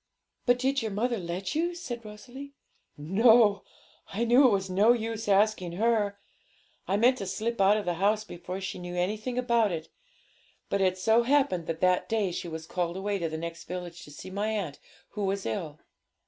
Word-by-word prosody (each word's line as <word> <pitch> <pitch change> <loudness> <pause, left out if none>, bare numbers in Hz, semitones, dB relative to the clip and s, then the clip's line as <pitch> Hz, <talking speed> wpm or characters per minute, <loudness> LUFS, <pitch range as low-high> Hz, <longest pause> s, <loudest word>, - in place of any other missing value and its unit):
'But 245 0 +5
did 265 +2 0
your 220 - -2
mother 230 +3 -1
let 180 +2 -4
you?' 345 +3 0
said 245 -9 -6
Rosalie. 245 +7 -10 0.4
'No; 205 +6 +4 0.4
I 225 +4 -2
knew 250 +3 +6
it - - +3
was 195 -1 0
no 200 +5 +4
use 225 -1 -4
asking 200 -3 +2
her. 210 0 +1 0.7
I 195 - +1
meant 250 +4 +4
to 195 - -4
slip 215 +4 -2
out 200 +2 +5
of 210 - -3
the 175 - 0
house 205 +5 +1
before 180 -1 -7
she 195 - -5
knew 175 0 -6
anything 215 +7 -2
about 235 -4 +2
it; 160 -2 -5 0.8
but 200 - 0
it 185 -1 +2
so 220 +5 +4
happened 245 - +1
that 165 -1 -4
that 185 0 +2
day 215 -5 0
she 175 - -5
was 160 -1 -6
called 175 +1 -2
away 200 +1 -2
to 165 -2 -2
the 160 - -4
next 170 +1 -6
village 175 -1 -7
to - - -14
see 150 +5 -10
my 200 +2 -1
aunt, 200 -9 -3 0.3
who 210 - -5
was 195 +1 -2
ill.' 145 +7 -4
200 Hz, 195 wpm, -28 LUFS, 180-230 Hz, 0.8 s, knew